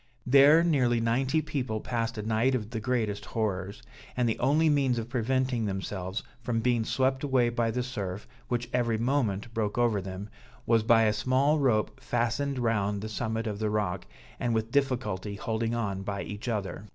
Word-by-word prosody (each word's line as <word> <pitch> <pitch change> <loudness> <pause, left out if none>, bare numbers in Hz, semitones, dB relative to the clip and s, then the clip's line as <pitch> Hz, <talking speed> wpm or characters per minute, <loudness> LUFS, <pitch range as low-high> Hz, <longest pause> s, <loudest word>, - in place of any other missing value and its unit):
There 140 +5 +7
nearly 130 -8 +2
ninety 130 +7 +1
people 125 -7 -2
passed 115 0 -2
a 105 - -3
night 115 +4 +2
of 110 -3 -4
the 115 - -3
greatest 110 -3 -1
horrors; 100 -3 -3 0.3
and 125 -1 +2
the 115 - -1
only 150 +5 +3
means 140 -5 +2
of 115 0 -4
preventing 130 -1 0
themselves 95 0 -3 0.2
from 120 -1 -1
being 120 0 +1
swept 130 +2 0
away 130 -4 +2
by 120 -1 0
the 125 +2 -1
surf, 100 -6 -5 0.2
which 120 -1 -2
every 120 -2 +1
moment 115 -3 0
broke 110 -2 -1
over 115 -4 +2
them, 95 +2 -6 0.4
was 115 -1 +4
by 115 0 +5
a 105 -1 +3
small 135 +7 +2
rope 120 -6 +1
fastened 120 +4 -1
round 105 -4 0
the 110 - -5
summit 110 +1 -2
of 105 -2 -3
the 110 -1 0
rock, 100 - -2 0.3
and 120 -2 0
with 110 +1 -1
difficulty 110 -8 -1
holding 115 +3 -2
on 100 -5 -2
by 100 0 -3
each 105 +4 -7
other. 105 -2 -3
115 Hz, 180 wpm, -28 LUFS, 105-125 Hz, 0.4 s, There